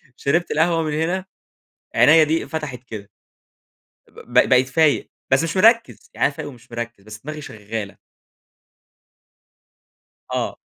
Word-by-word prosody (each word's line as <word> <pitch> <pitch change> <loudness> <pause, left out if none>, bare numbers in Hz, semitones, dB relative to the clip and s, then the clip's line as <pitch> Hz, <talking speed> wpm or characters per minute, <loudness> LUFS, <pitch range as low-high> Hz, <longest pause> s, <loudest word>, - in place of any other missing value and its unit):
شربت 170 +5 0
القهوة 165 +1 +2
من 155 -1 -2
هنا، 175 +5 -1 0.7
عينيا 155 +1 +6
دي 160 +2 0
انفتحت 150 -6 -5
كده 105 -4 -9 1.0
ب - - -16 0.2
ب - - +3
بقيت 130 0 +4
فايق 150 +2 +2 0.2
بس 135 +3 +4
مش 165 +3 -2
مركز، 230 +4 +3
يعني - - +2
أنا 140 - -6
فايق 155 -2 -6
ومش 120 -4 -16
مركز 120 -3 -6
بس 105 +1 -11
دماغي 155 +1 -6
شغالة. 110 -4 -7 2.4
آه. - - -2
150 Hz, 135 wpm, -21 LUFS, 120-160 Hz, 2.4 s, عينيا